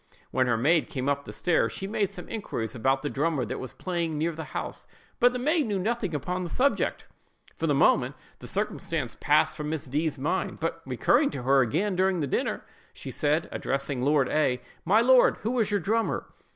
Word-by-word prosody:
When 130 0 +2
her 115 -2 +2
maid 150 +7 +2
came 130 -1 -3
up 140 0 -1
stairs, 175 -3 +1
she 195 - -5
made 200 -1 0
some 180 - -9
inquiries 125 - -4
about 135 +3 +1
the - - -1
drummer 145 -2 0
that 130 - -4
was 130 - -7
playing 170 -4 -2
near 165 +3 0
the 160 0 -7
house; - - -6 0.3
but 245 +1 +6
the 250 - -3
maid 300 +3 +1
knew 205 -2 0
nothing 205 -3 -1
on 180 +5 -2
the 175 - -4
subject. 275 +8 +1 0.5
For 165 - -2
the 145 - +2
moment, - - +3 0.2
the - - -10
circumstance - - -2
passed - - +3
from 150 -1 -4
Miss 160 -2 -3
D——'s 150 +3 -1
mind; 155 +8 -2
but 165 +1 -2
recurring 240 - +3
to 130 - -6
her 135 +1 +4
again 185 - 0
during 185 0 +2
the 150 - 0
dinner, 135 - -1 0.3
she - - -8
said, 150 +2 0
addressing 135 -1 -2
Lord 140 0 +3
A——, 130 -5 +1 0.2
"My 205 +6 +5
lord, 255 +1 +5
who 240 +3 0
is 215 -3 +2
your 205 -1 +1
drummer?" 220 +6 -1
160 Hz, 205 wpm, -27 LUFS, 135-200 Hz, 0.5 s, but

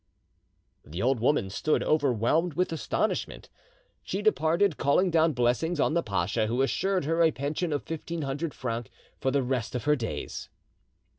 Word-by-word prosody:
The 85 +8 -5
old 130 0 +2
woman 115 -5 +1
stood 155 +9 0
overwhelmed 145 +3 +1
with 180 0 0
astonishment. 160 - -2 0.5
She 200 +2 -4
departed 170 -2 +2
calling 180 +6 +2
down 160 -1 +3
blessings 125 +7 +1
on 155 - +2
the 170 - +2
pasha, 100 - -1
who 120 +4 +1
assured 190 +4 0
her 165 +2 +1
a 165 - +6
pension 150 +4 -2
of 145 - -1
fifteen 165 0 -5
hundred 145 +3 -3
francs 115 -3 -4 0.3
for 135 - 0
the 135 0 +1
rest 125 -2 -2
of 125 - -2
her 150 +1 +3
days. 115 -5 -5
145 Hz, 160 wpm, -28 LUFS, 125-165 Hz, 0.5 s, a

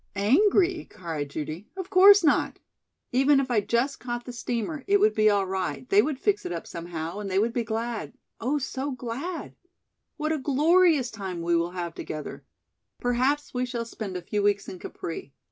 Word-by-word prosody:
"Angry?" 350 - +3
cried 160 -5 -5
Judy. 155 +6 -5
"Of 380 0 -6
course 395 +1 +8
not. 300 - +2 0.5
Even 270 +3 +4
if 265 -2 -2
I 220 -3 +3
just 240 +6 0
caught 240 -1 -4
the 245 - -7
steamer, 240 +5 -3
it 400 0 +4
would 425 +2 +4
be 215 0 +4
all 200 -2 +2
right, 185 -9 -3
they 200 - +6
would 285 +3 -2
fix 410 +8 +1
it - - -5
up 170 -1 -4
somehow, 170 +1 -5
and 205 -1 -4
they 190 - 0
would 225 +3 +2
be 240 - 0
glad 225 +1 -3 0.3
oh, 265 +6 0
so 280 0 -3
glad! 260 +7 -5 0.6
What 310 0 -1
a 315 - 0
glorious 300 0 +3
time 190 -5 -5
we 170 0 +2
will 170 +1 +1
have 175 -2 -4
together. 155 -2 -7 0.6
Perhaps 255 +4 0
we 250 0 0
shall 240 -2 -3
spend 210 -5 -6
a 180 - -7
few 205 +4 -1
weeks 200 -1 +1
in 185 - -8
Capri. 160 -6 -7
235 Hz, 190 wpm, -26 LUFS, 190-290 Hz, 0.6 s, course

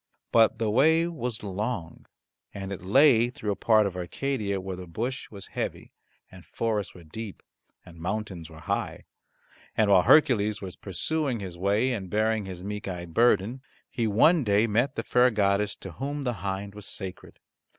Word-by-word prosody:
But 115 -1 +5
the 110 -2 0
way 160 +8 +4
was 125 -10 -4
long, 100 -3 -4 0.5
and 100 0 -5
it 95 - -7
lay 120 +3 +5
through 110 -4 -4
a - - -1
part 110 -1 +4
of 95 -2 -3
Arcadia 100 +2 -2
where 95 0 -5
the 90 0 -9
bush 120 +10 -4
was 100 -3 -10
heavy, - - -4 0.4
and 90 -2 -13
forests 105 +5 -2
were 90 - -12
deep, 100 +6 -8 0.4
and 85 -2 -14
mountains 90 -2 -4
were 80 -1 -12
high, - - -3 0.7
and 105 -2 +3
while 95 -2 +7
Hercules 110 - +4
was 95 -2 -7
pursuing 135 - -2
his 95 -3 -7
way 100 +8 +1
and 95 -5 -5
bearing 110 +1 +1
his 90 -1 -7
meek 105 +1 -5
eyed 85 -3 -6
burden, 115 +2 +3 0.3
he 115 -2 0
one 150 - +4
day 105 0 +3
met 120 +5 +1
the 115 - -2
fair 125 +2 +4
goddess 105 -2 +1
to 95 - -9
whom 140 - -4
the 125 -2 0
hind 100 +1 -3
was 105 -1 -9
sacred. 95 -3 -7
105 Hz, 175 wpm, -27 LUFS, 95-120 Hz, 0.7 s, while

